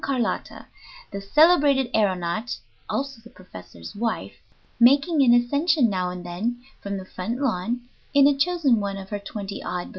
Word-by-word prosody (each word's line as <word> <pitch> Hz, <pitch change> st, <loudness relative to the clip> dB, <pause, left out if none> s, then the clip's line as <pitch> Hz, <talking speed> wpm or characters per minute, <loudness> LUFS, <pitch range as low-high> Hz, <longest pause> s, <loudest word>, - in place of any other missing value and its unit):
Carlotta, 255 Hz, -5 st, -2 dB, 0.5 s
the 200 Hz, -, -5 dB
celebrated 280 Hz, -, +4 dB
aëronaut 200 Hz, +2 st, 0 dB, 0.3 s
(also 275 Hz, -3 st, -3 dB
the 235 Hz, -, -14 dB
professor's 90 Hz, -, -12 dB
wife), 225 Hz, +2 st, -3 dB, 0.5 s
making 280 Hz, +6 st, +5 dB
an 255 Hz, -3 st, +5 dB
ascension 250 Hz, +2 st, +3 dB
now 185 Hz, -2 st, -1 dB
and 180 Hz, 0 st, -7 dB
then 215 Hz, +8 st, -3 dB, 0.2 s
from 200 Hz, 0 st, -4 dB
the 190 Hz, -, -7 dB
front 220 Hz, +7 st, -5 dB
lawn 240 Hz, -2 st, -1 dB, 0.3 s
in 280 Hz, -1 st, +5 dB
a 285 Hz, 0 st, +5 dB
chosen 285 Hz, -5 st, +2 dB
one 200 Hz, -1 st, -3 dB
of 195 Hz, -1 st, -9 dB
her 205 Hz, -, -2 dB
twenty 200 Hz, 0 st, -7 dB
odd 180 Hz, -, -3 dB
balloons. -, -, -10 dB
230 Hz, 160 wpm, -24 LUFS, 195-275 Hz, 0.5 s, making